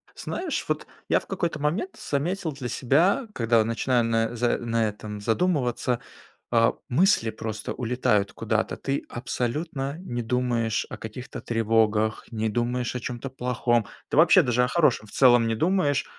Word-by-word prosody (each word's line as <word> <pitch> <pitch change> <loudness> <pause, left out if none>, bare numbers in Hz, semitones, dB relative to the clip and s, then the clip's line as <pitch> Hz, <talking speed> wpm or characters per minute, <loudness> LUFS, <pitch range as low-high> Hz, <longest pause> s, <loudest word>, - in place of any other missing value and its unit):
Знаешь, 350 -3 -3
вот - - -2 0.2
я - - +3
в - - -17
какой-то 170 -4 -2
момент 165 - -1
заметил 165 +4 -2
для 135 -3 -6
себя, 175 - +2
когда 115 -1 +3
начинаю 115 +2 +1
на 115 +1 0
за 120 0 +1
на 115 -1 0
этом 105 0 -8
задумываться, 125 - 0 0.5
э, 115 -1 +4 0.2
мысли 150 - +3
просто 110 -1 -5
улетают 115 -5 0
куда-то. 110 0 -1
Ты 140 0 -2
абсолютно 135 +4 -3
не 120 -10 -4
думаешь 115 -2 0
о - - -7
каких-то 110 +3 -8
тревогах, 110 -1 +1
не 110 -1 -1
думаешь 120 +3 -1
о - - -1
чём-то 125 +2 -5
плохом. 125 -3 0 0.2
Ты - - -1
вообще 170 +4 +7
даже 125 -4 +2
о 125 - +2
хорошем 125 -7 +2
в - - -16
целом 120 -3 +5
не 115 - 0
думаешь. 155 - +1
120 Hz, 155 wpm, -25 LUFS, 115-140 Hz, 0.5 s, вообще